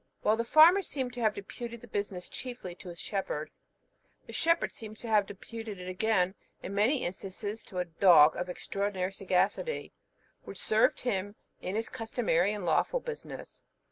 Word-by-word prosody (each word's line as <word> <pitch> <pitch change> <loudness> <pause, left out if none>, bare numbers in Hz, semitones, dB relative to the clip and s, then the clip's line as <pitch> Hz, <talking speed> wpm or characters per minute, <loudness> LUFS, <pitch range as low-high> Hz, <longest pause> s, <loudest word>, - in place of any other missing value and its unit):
While 215 - +4
the 230 - +1
farmer 315 +10 +7
seemed 260 -8 -3
to 245 - -7
have 220 -3 +2
deputed 235 +3 -7
the 240 - -12
business 200 -4 -3
chiefly 245 -8 -6
to 180 +1 -10
his 170 -1 -8
shepherd, 175 -6 -3 0.7
the - - -10
shepherd 335 +1 +2
seemed 215 -1 -8
to 235 - -7
have 210 -3 +3
deputed 215 0 -8
it 180 - -7
again, 185 -1 +1 0.3
in 195 - -5
many 225 +8 +2
instances, 200 +4 -5
to 185 - -9
a 180 - 0
dog 165 -3 +6
of 180 0 -3
extraordinary 195 0 -2
sagacity, 195 - 0 0.5
which - - -9
served 215 0 +2
him 205 -4 -2 0.3
in 185 - -3
his 225 +1 0
customary 225 -6 0
and 205 -3 -4
lawful 170 - +2
business. 475 -2 -8
205 Hz, 170 wpm, -30 LUFS, 185-235 Hz, 0.7 s, farmer